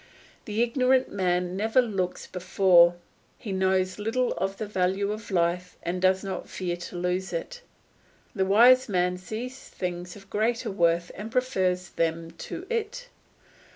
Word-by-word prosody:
The 215 +2 0
ignorant 255 +2 +2
man 180 -2 0
never 220 +5 +2
looks 195 -7 -1
before; 180 -1 +4 0.4
he 210 - -7
knows 190 0 +1
little 235 +4 0
of 195 +1 -2
the 215 - -3
value 195 0 0
of 215 +1 -6
life 180 -1 0
and 180 +2 -2
does 190 +1 +3
not 190 -2 -5
fear 180 -2 -3
to 175 +1 -9
lose 180 +1 -1
it; 180 - -5 0.7
the 195 -5 +1
wise 240 +6 +6
man 180 -1 +1
sees 240 +7 -6
things 180 -1 -6
of 195 -1 -14
greater 225 +2 0
worth 170 -2 +1
and 215 +3 -7
prefers 185 -8 0
them 165 0 -1
to 170 - -7
it. 470 +2 -3
190 Hz, 150 wpm, -26 LUFS, 180-220 Hz, 0.7 s, wise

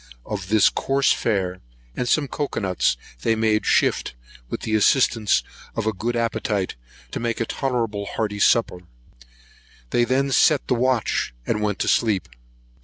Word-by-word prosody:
Of 100 -3 -5
this 110 -1 +5
coarse 135 0 +1
fare, 95 -5 -1 0.3
and 125 - -2
some 150 -2 +2
cocoa 145 +1 -3
nuts, 90 - +1 0.2
they 115 - +2
made 110 -1 +1
shift, - - +2 0.3
with - - -4
the 110 - -3
assistance 110 0 +3 0.3
of 115 - -2
a 110 - +1
good 120 +5 -3
appetite, 110 -4 -1 0.4
to - - -4
make 115 -1 -2
a 115 - 0
tolerable 115 -7 -2
hearty 105 -2 -3
supper; 100 -4 +3 1.1
they 120 - +3
then 135 +3 +1
set 145 +2 +3
the - - +2
watch, 125 - 0
and 105 - -1
went 105 -2 -1
to - - -2
sleep. 105 -5 +2
110 Hz, 155 wpm, -23 LUFS, 105-120 Hz, 1.1 s, this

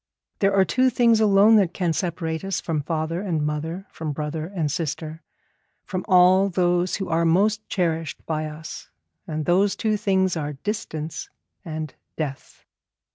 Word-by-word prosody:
There 195 0 +3
are 190 -1 +5
two 255 +4 +3
things 235 -2 +4
alone 210 +1 +6
that 185 -4 +2
can 175 -4 0
separate 165 -2 -2
us 195 -2 -1
from 160 -3 -2
father 160 +3 -2
and 165 -7 -1
mother, 160 +5 -3
from 155 -2 -4
brother 155 +2 -4
and 170 -6 -2
sister, 160 0 -4 0.6
from 185 -2 -4
all 185 +1 +5
those 175 0 +1
who 195 - -3
are 165 +1 +1
most 205 +6 +2
cherished 165 -4 -2
by 155 -1 -2
us, 155 +2 -8 0.4
and 155 -1 -3
those 195 +3 +3
two 215 -1 0
things 190 -3 +1
are 150 -2 -3
distance 160 -2 -5 0.3
and 155 -2 -5 0.2
death. 145 -4 -6
170 Hz, 155 wpm, -24 LUFS, 155-195 Hz, 0.6 s, alone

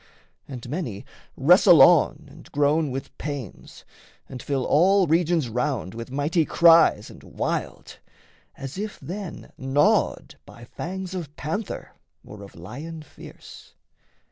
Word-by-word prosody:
And 125 -4 -8
many 125 - -5 0.3
wrestle - - +6
on - - +5
And - - -16
groan 145 +1 +1
with 135 +1 -7
pains, 140 - -8 0.4
and 125 -2 -9
fill 135 -3 -2
all 190 +5 +4
regions 165 -2 +1
round 125 -4 -2
With 115 +1 -8
mighty 145 +5 0
cries 165 -9 +4
and - - -14
wild, - - -5 0.6
as 135 +6 -7
if 210 0 -5
then 190 -1 -8
gnawed 135 +2 +1
By 120 - -14
fangs 185 +7 -6
of 160 -6 -6
panther 175 +8 -5 0.3
or 105 0 -11
of 100 - -13
lion 145 - -9
fierce. - - -14
145 Hz, 125 wpm, -24 LUFS, 125-170 Hz, 0.6 s, wrestle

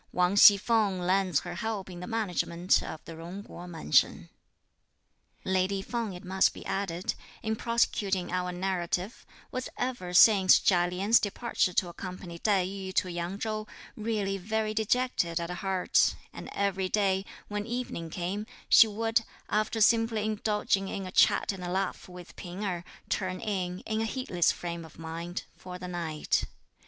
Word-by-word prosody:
Wang 180 +2 +2
Hsi 205 0 +9
feng 210 -3 +1
lends 185 -3 +2
her 175 - -6
help 205 +1 -3
in 175 - -8
the 180 - -7
management 185 -5 +1
of 155 - -7
the 165 - -8
Jung 175 +5 -8
Kuo 180 -3 -10
Mansion. 160 - +2 1.2
Lady 190 +1 +1
Feng, 230 -4 -3
it 180 - -10
must 190 +1 +2
be - - -10
added, 185 -2 -2 0.3
in 220 0 0
prosecuting 200 -6 0
our 180 0 -1
narrative, 180 +2 -2 0.2
was 255 0 -4
ever 245 -8 -3
since 190 0 +7
Chia 175 -2 +3
Lien's 195 +6 +3
departure 205 -3 -1
to 180 - +2
accompany 180 -1 -8
Tai 195 -3 +2
yü 190 0 -5
to 180 - +1
Yang 175 +3 -3
Chou, 215 -1 -3 0.3
really 210 -3 -2
very 215 +3 -1
dejected 220 -6 +1
at 170 +1 -4
heart; 185 +1 +2 0.2
and - - -8
every 195 -2 -1
day, 195 -2 +2 0.2
when 205 0 -4
evening 235 -9 -4
came, 185 +6 -3 0.2
she 225 - +8
would, 225 +2 +1 0.3
after 215 +2 0
simply 225 -1 +3
indulging 210 -2 0
in 195 0 -4
a 185 - -6
chat - - +4
and 190 -2 -7
a 175 - -4
laugh 190 0 -2
with 180 -1 -11
P'ing 180 +3 -7
Erh, 175 -3 -2 0.2
turn 185 -2 -2
in, 185 -3 -3
in 220 0 -2
a - - 0
heedless 220 -8 +1
frame 170 -1 -5
of 160 - -14
mind, 165 +2 -5
for 180 -1 -9
the 180 - -7
night. 170 -4 -1
190 Hz, 165 wpm, -29 LUFS, 180-215 Hz, 1.2 s, Hsi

